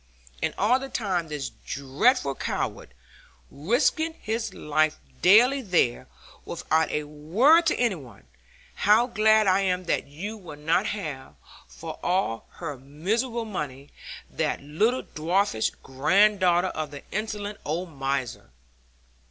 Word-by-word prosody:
And - - -1
all 235 +6 +3
the 270 0 -7
time 185 -9 -1
this 145 -3 -5
dreadful 140 - +1
"coward" 130 - -4 0.6
risking 255 - +1
his 220 -3 -3
life 155 -2 0 0.2
daily 245 +9 +6
there, 175 - +1 0.4
without 160 0 0
a 150 - -1
word 200 - +3
to - - +3
any 240 -4 +2
one! 125 - -12 0.5
How 215 +4 +4
glad 220 -2 +4
I 190 0 +4
am 185 -2 0
that 165 - -1
you 195 +10 -6
will 165 -7 -10
not 165 +7 +1
have, 150 - -5 0.3
for - - -9
all 175 - -1
her 145 -6 -6
miserable 220 - -2
money, 145 -9 -6 0.4
that - - -2
little 210 - 0
dwarfish 165 - 0
granddaughter 185 +5 +3
of 155 -3 -4
the 145 -1 -10
insolent 210 -1 -4
old 170 +3 -3
miser!' 135 - -3
180 Hz, 125 wpm, -26 LUFS, 150-215 Hz, 0.6 s, daily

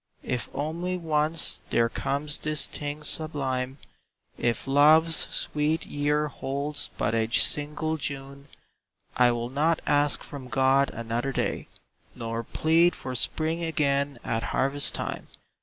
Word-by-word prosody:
If 125 -1 -3
only 170 +5 -2
once 160 -1 +1
there 115 0 +3
comes 145 +5 -2
this 155 0 +1
thing 145 +1 -5
sublime. 135 -5 -1 0.6
If 120 -1 -1
Love's 155 +4 +5
sweet 150 +2 -1
year 150 +1 0
holds 145 +1 -3
but 105 +1 0
a 110 0 +1
single 150 +5 +1
June 140 -1 -6 0.4
— - - -61 0.3
I 125 -1 +5
will 120 +1 -3
not 155 +4 +2
ask 145 0 +2
from 140 -3 -9
God 135 +2 +3
another 115 +3 -3
day, - - -2 0.5
Nor 115 -1 -4
plead 165 +7 +3
for 130 - -6
Spring 160 +6 -1
again 140 -3 0
at 115 - -1
harvest 135 +6 +1
time. - - -4
145 Hz, 130 wpm, -27 LUFS, 130-155 Hz, 0.6 s, Love's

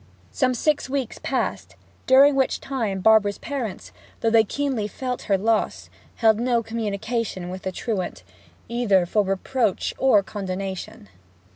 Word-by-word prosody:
Some 255 -2 +1
six 295 +2 0
weeks 265 -4 -3
passed, - - -2 0.3
during 275 +2 +7
which 265 -1 +1
time 225 -8 -3
Barbara's 210 -1 +4
parents, 255 -9 -5 0.3
though 225 - +2
they 225 -1 +6
keenly 260 -2 -2
felt 250 +3 -4
her 195 - +4
loss, 220 +2 -1 0.2
held 220 -2 +3
no 240 -1 +1
communication 220 -3 -3
with 185 0 -6
the 190 - -3
truant, 195 -2 -4 0.4
either 220 -6 +2
for 210 +4 +2
reproach 195 +3 -1
or 220 -7 +4
condonation. 190 - -5
220 Hz, 135 wpm, -23 LUFS, 195-255 Hz, 0.4 s, during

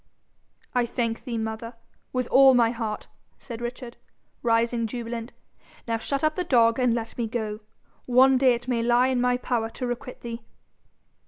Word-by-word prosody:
'I 245 -1 +1
thank 230 -1 -2
thee, 235 -2 -3
mother, 220 +1 -4 0.4
with 255 -1 -1
all 265 -1 +7
my 230 -2 +4
heart,' 225 -3 -4 0.3
said 235 -2 -8
Richard, 240 0 -6 0.4
rising 230 0 +1
jubilant. 235 0 -5 0.6
'Now 230 0 -1
shut 275 +5 -2
up 310 0 +3
the 360 - -1
dog, 230 -6 +3
and 250 -2 +3
let 230 -1 -4
me 235 - 0
go. 215 -2 -3 0.5
One 260 +2 +6
day 255 -2 +5
it 240 +1 -9
may 240 -2 0
lie 240 +2 +3
in 255 -2 +1
my 250 0 +2
power 235 -3 -1
to 250 - -5
requite 245 +1 -5
thee.' 235 0 -6
240 Hz, 170 wpm, -25 LUFS, 230-250 Hz, 0.6 s, all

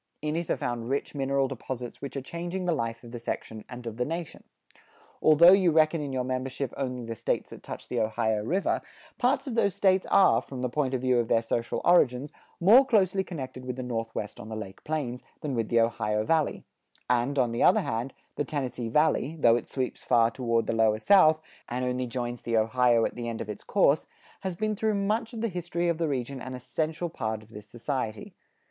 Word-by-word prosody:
In 150 0 -1
it 170 -1 -3
are - - +1
found 120 -1 -3
rich 140 +1 -2
mineral 135 -1 +1
deposits 125 -2 -6
which 140 0 -5
are 135 - -4
changing 175 +6 -4
the 175 - +2
life 115 -6 -2
of 120 - -11
the 120 - -6
section 110 -2 -5
and 125 -1 -9
of 115 -1 -5
the 125 - +1
nation. 165 +4 -5 0.8
Although 160 +3 +8
you 190 -2 +5
reckon 160 0 +3
in 145 -2 -4
your 130 -1 -1
membership 130 0 -3
only 125 -3 -3
the 115 - -4
states - - -2
that - - -10
touch - - -8
the - - -2
Ohio 110 -1 0
River, 185 - 0 0.4
parts 265 +3 +2
of 260 - -4
those 200 -5 +2
states 190 -1 +3
are, 195 -1 +5
from 130 -2 -8
the 125 - 0
point 135 0 0
of 125 - -2
view 130 -1 +3
of 115 - 0
their 115 +1 +2
social 115 +1 -2
origins, 140 -5 +3 0.3
more 220 +10 +7
closely 195 -7 +2
connected 135 -8 -7
with 125 -1 -4
the 130 - -5
Northwest 115 -3 -4
on 110 - -9
the 110 - -5
Lake 100 -3 -8
Plains, 135 -5 -3 0.2
than 145 -3 -3
with 115 -3 -1
the 115 - +3
Ohio 105 -2 +1
Valley; 160 +4 +1 0.4
and, 125 +3 +1
on 125 -3 +2
the 115 - -2
other - - +5
hand, 115 +4 -3 0.3
the - - +1
Tennessee 130 -5 -3
Valley, 150 +2 +2
though 115 -4 +6
it 120 - -3
sweeps 130 -2 -3
far 115 -1 +4
toward 115 -2 0
the - - -1
Lower 110 -1 +3
South, 160 - +5 0.3
and 125 +1 -2
only 125 0 -1
joins 120 0 -4
the 115 -1 0
Ohio 115 +1 +3
at - - -2
the 120 -1 -4
end 115 - -5
of 110 - -5
its 105 - -9
course, - - +2 0.3
has 190 -2 -4
been 215 +3 -1
through 215 +1 0
much 215 +3 0
of 230 -3 -6
the 230 - +1
history 175 -2 -2
of 170 -1 -1
the 165 - +1
region 130 -1 -3
an 130 0 -6
essential 160 +6 -2
part 110 -8 -4
of 110 - -20
this 105 -1 -11
society. 115 -2 -4
130 Hz, 220 wpm, -28 LUFS, 115-165 Hz, 0.8 s, Although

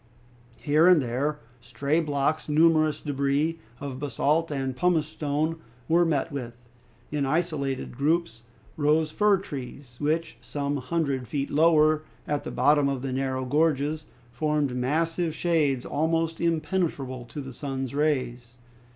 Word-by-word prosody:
Here 155 +3 +3
and 180 -3 +7
there 135 +4 -1 0.2
stray 140 +6 -1
blocks, 150 0 -1
numerous 155 0 +4
debris 145 +3 0 0.2
of 140 -2 -6
basalt 150 +3 +1
and 135 -3 -2
pumice 165 +1 +2
stone, 155 +1 -2 0.3
were 170 +2 +4
met 155 -1 0
with. 120 -3 -7 0.4
In 150 -1 0
isolated 140 -4 -1
groups 150 -3 0 0.4
rose 155 +1 +2
fir 210 +3 +3
trees, 130 -4 -8
which, 160 +3 -1
some 145 0 -2
hundred 135 -2 -1
feet 140 +2 -3
lower, 155 0 +4 0.3
at 145 -1 -1
the - - -5
bottom 145 +3 +3
of 135 -2 -3
the 135 -1 -2
narrow 130 0 -1
gorges, 150 +2 +1 0.2
formed 145 +1 0
massive 160 +5 0
shades 150 -8 +1
almost 165 +2 0
impenetrable 155 -6 -1
to 135 - -8
the 135 -2 -7
sun's 135 -1 -4
rays. 130 -5 -1
145 Hz, 135 wpm, -26 LUFS, 135-160 Hz, 0.4 s, and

